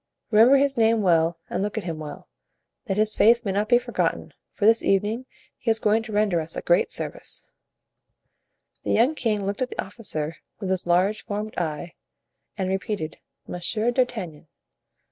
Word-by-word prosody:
Remember 230 Hz, +6 st, +7 dB
his 275 Hz, -1 st, +2 dB
name 225 Hz, -1 st, +3 dB
well 165 Hz, -2 st, +3 dB
and -, -, -2 dB
look 210 Hz, +2 st, -2 dB
at 220 Hz, -, -2 dB
him 165 Hz, -3 st, -4 dB
well, 150 Hz, -1 st, -8 dB, 0.6 s
that 195 Hz, -1 st, -1 dB
his 215 Hz, 0 st, +2 dB
face 235 Hz, +3 st, +4 dB
may 195 Hz, -, 0 dB
not 205 Hz, +2 st, 0 dB
be 240 Hz, -, +7 dB
forgotten, 245 Hz, -, -2 dB, 0.2 s
for 205 Hz, -, -2 dB
this 225 Hz, +1 st, +5 dB
evening 210 Hz, +6 st, 0 dB, 0.3 s
he 235 Hz, -, -2 dB
is 225 Hz, -, +3 dB
going 220 Hz, 0 st, +2 dB
to 225 Hz, 0 st, -9 dB
render 205 Hz, -5 st, +2 dB
us 160 Hz, +1 st, -5 dB
a -, -, -4 dB
great 175 Hz, -, +3 dB
service." -, -, -4 dB, 1.4 s
The -, -, 0 dB
young 245 Hz, +7 st, +4 dB
king 215 Hz, -8 st, -1 dB
looked 200 Hz, +3 st, -3 dB
at 255 Hz, -, 0 dB
the -, -, -9 dB
officer 165 Hz, -7 st, -3 dB, 0.2 s
with 195 Hz, -3 st, -3 dB
his 185 Hz, -2 st, -1 dB
large 190 Hz, +5 st, +2 dB
formed 210 Hz, +1 st, -4 dB
eye, 165 Hz, 0 st, -3 dB, 0.6 s
and 190 Hz, -2 st, -1 dB
repeated: 190 Hz, -4 st, -3 dB, 0.3 s
"Monsieur 215 Hz, +7 st, -1 dB
d'Artagnan." 215 Hz, -, -2 dB
210 Hz, 175 wpm, -24 LUFS, 175-225 Hz, 1.4 s, Remember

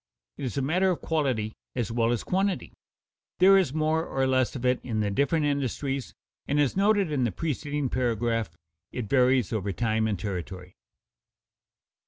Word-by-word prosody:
It -, -, -5 dB
is 130 Hz, -, -4 dB
a 135 Hz, -, +1 dB
matter 180 Hz, +7 st, +2 dB
of 180 Hz, -, 0 dB
quality 130 Hz, -9 st, -1 dB, 0.2 s
as 120 Hz, -4 st, -2 dB
well 115 Hz, 0 st, +1 dB
as 120 Hz, -, -1 dB
quantity. 190 Hz, +1 st, -1 dB, 0.6 s
There 190 Hz, +2 st, +7 dB
is 190 Hz, -8 st, +3 dB
more 155 Hz, +2 st, +1 dB
or 135 Hz, -4 st, -1 dB
less 130 Hz, -1 st, +1 dB
of 130 Hz, -1 st, -4 dB
it 125 Hz, 0 st, +2 dB
in 110 Hz, -4 st, -3 dB
the 105 Hz, -1 st, 0 dB
different 140 Hz, +8 st, +1 dB
industries, 140 Hz, -2 st, -2 dB, 0.3 s
and, 145 Hz, +1 st, +1 dB
as 145 Hz, -3 st, +2 dB
noted 200 Hz, -3 st, +2 dB
in 140 Hz, -4 st, +1 dB
the 120 Hz, -, +1 dB
preceding 145 Hz, -1 st, -2 dB
paragraph, 115 Hz, -3 st, 0 dB, 0.4 s
it 125 Hz, -, -4 dB
varies 125 Hz, -2 st, +3 dB
over 100 Hz, -2 st, -1 dB
time 110 Hz, +4 st, 0 dB
and 105 Hz, -2 st, -1 dB
territory. 90 Hz, -1 st, -6 dB
130 Hz, 170 wpm, -27 LUFS, 115-150 Hz, 0.6 s, There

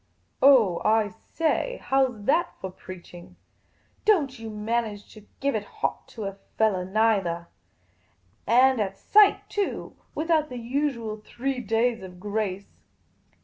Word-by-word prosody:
" 85 Hz, -, -44 dB
Oh, 235 Hz, -11 st, +6 dB
I 215 Hz, -1 st, +3 dB
say; 330 Hz, -, -2 dB
how 270 Hz, 0 st, +2 dB
's 215 Hz, -4 st, -12 dB
that 325 Hz, +10 st, +1 dB
for 190 Hz, -, -5 dB
preaching? 180 Hz, -1 st, -12 dB, 0.7 s
Don't 295 Hz, -, +2 dB
you 225 Hz, 0 st, -6 dB
man 220 Hz, +3 st, -1 dB
age 205 Hz, -2 st, -10 dB
to 215 Hz, -1 st, -15 dB
give 280 Hz, 0 st, 0 dB
it 210 Hz, -, -1 dB
hot -, -, -4 dB
to 220 Hz, -, -8 dB
a 195 Hz, 0 st, -5 dB, 0.2 s
fellah, 195 Hz, -5 st, +2 dB
neithah! 195 Hz, -6 st, +1 dB, 1.0 s
And 255 Hz, +1 st, +5 dB
at 195 Hz, -1 st, -3 dB
sight, 415 Hz, -1 st, +4 dB
too, 410 Hz, -1 st, -3 dB, 0.2 s
without 315 Hz, -1 st, +1 dB
the 250 Hz, -, -6 dB
usual 235 Hz, -3 st, -2 dB
three 265 Hz, +3 st, -3 dB
days 230 Hz, +1 st, 0 dB
of 180 Hz, -1 st, -10 dB
grace. 200 Hz, -1 st, -4 dB
225 Hz, 145 wpm, -26 LUFS, 200-270 Hz, 1.0 s, Oh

